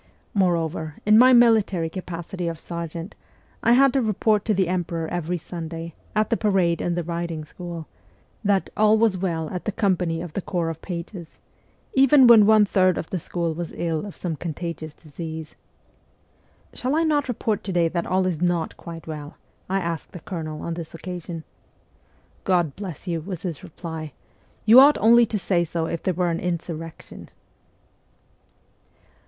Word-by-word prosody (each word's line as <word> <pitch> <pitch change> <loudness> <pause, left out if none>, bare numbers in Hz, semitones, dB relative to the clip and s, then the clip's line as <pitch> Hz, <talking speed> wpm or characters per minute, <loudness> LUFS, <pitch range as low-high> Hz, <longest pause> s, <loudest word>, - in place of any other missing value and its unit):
Moreover, 165 -5 0
in 210 +1 +6
my 255 +1 +8
military 220 -8 +4
capacity 175 0 -5
of 165 -1 -4
sergeant 170 +2 -6 0.5
I 235 - +4
had 270 +1 +5
to 270 - +2
report 215 -1 +1
to 220 - +2
the 190 -2 +2
emperor 170 -2 -2
every 175 +1 -2
Sunday, 165 0 -7 0.2
at 215 0 +1
the 230 - +3
parade 185 -5 +2
in 175 - -1
the 175 - -1
riding 170 -2 -4
school, 170 0 -7 0.6
that 200 -2 +1
' - - -39
all 215 +1 +4
was 220 -3 +3
well 170 -4 -2
at 180 - -5
the - - 0
company 180 -6 0
of 170 -2 -7
the 195 - -2
Corps 170 -3 -2
of 165 - -10
Pages,' 170 -1 -7 0.6
even 270 0 +6
when 225 -4 +8
one 215 -1 +6
third 185 -2 +3
of - - -5
the 185 - -1
school 170 0 -2
was 170 +1 -5
ill 165 -2 -1
of 200 - -9
some 170 -3 -3
contagious 160 -1 -5
disease. 160 0 -8 0.6
' - - -36
Shall 260 +4 -1
I 325 - +3
not 295 -3 +1
report 220 -3 -1
to 195 - -3
day 175 -2 +3
that 170 +1 -2
all 185 0 +1
is 175 -3 -2
not 175 -2 0
quite 165 -1 -9
well?' 150 -1 -7 0.3
I 195 +1 +1
asked 170 -3 -4
the 180 - -7
colonel 155 -4 -5
on 170 - -3
this 165 -1 -7
occasion. 175 0 -6
1 160 - -7 1.0
God 175 -6 +1
bless 185 -4 -7
you,' 170 -2 -1
was 180 0 -6
his 170 -6 -4
reply, 160 -3 -7 0.5
'you 225 +4 +9
ought 285 +2 +7
only 235 +1 +6
to 215 - -2
say 180 -3 +1
so 165 0 -2
if 165 0 -3
there 185 - -1
were 175 -1 +1
an 165 - -2
insurrection 165 -2 -5
175 Hz, 180 wpm, -24 LUFS, 165-200 Hz, 1.0 s, you